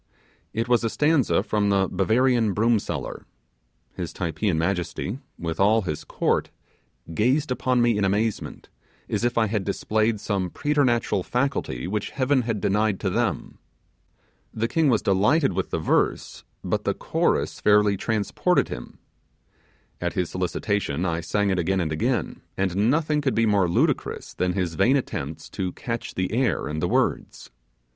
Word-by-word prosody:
It 115 +2 -2
was 120 -1 +3
a 115 - +1
stanza 150 0 +2
from 105 -1 0
the 100 -1 +2
'Bavarian 115 +3 +2
broom 115 +2 +3
seller'. - - -5 0.7
His - - -5
Typeean 85 +1 -1
majesty, 90 +6 -2 0.2
with 80 -1 -4
all 105 +3 +4
his 75 -4 -4
court, - - 0 0.6
gazed 130 - +1
upon 125 -1 +1
me 115 -3 +2
in - - +1
amazement, 105 +3 -1 0.4
as - - -2
if 120 0 0
I 115 - +4
had 105 -2 -1
displayed 110 +2 0
some 95 -3 -2
preternatural 125 - +1
faculty 125 - -2
which 100 +3 -2
Heaven 130 0 +1
had 115 -3 -2
denied 105 +1 +1
to - - 0
them. - - -2 0.9
The 115 +1 -1
King 155 +4 +2
was 115 -4 +2
delighted 105 - +3
with 95 +1 -2
the - - -1
verse; 80 - 0 0.2
but - - -1
the - - 0
chorus - - 0
fairly 105 -1 +4
transported 105 +1 0
him. - - -8 1.0
At 90 0 -1
his 90 -3 -2
solicitation 90 -2 -1
I 85 -2 -1
sang 100 +4 0
it 95 - 0
again 95 +3 +1
and 80 -3 -1
again, 75 - -1 0.2
and 95 +3 +1
nothing 150 +1 +1
could 135 -3 0
be 115 - +3
more 100 -4 +3
ludicrous 85 - 0
than 90 0 0
his 90 -3 -1
vain 125 - +3
attempts 75 - -5
to 90 -1 -3
catch 115 -3 -5
the 95 0 -1
air 120 +1 0
and 75 +1 -3
the - - +1
words. - - -1
105 Hz, 160 wpm, -24 LUFS, 90-120 Hz, 1.0 s, all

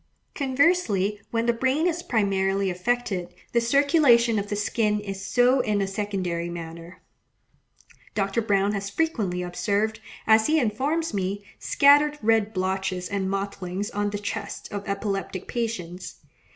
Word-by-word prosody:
Conversely 260 - +1
when 230 0 0
the 235 - +3
brain 265 +7 +1
is 345 -1 0
primarily 195 - +1
affected; 180 -2 -2 0.2
the 235 - +3
circulation 245 -3 +4
of 200 0 -5
the 205 - -1
skin 210 0 0
is 195 -2 -6
so 245 +6 +3
in 210 -4 +1
a 195 - +1
secondary 190 -4 -3
manner. 170 +1 -9 1.1
Dr. 200 +2 0
Browne 200 -2 +2
has 200 -1 -3
frequently 200 - -1
observed, 205 +5 -1 0.3
as 220 0 +5
he 315 +1 +3
informs 275 +7 -1
me, 200 +1 -2
scattered 290 +1 +4
red 220 -1 +3
blotches 190 -1 -2
and 195 -2 -1
mottlings 195 +1 -3
on 205 0 -1
the 205 - -3
chests 200 0 -5
of 205 -1 -6
epileptic 195 -2 -3
patients. 190 -7 -4
205 Hz, 140 wpm, -25 LUFS, 195-235 Hz, 1.1 s, as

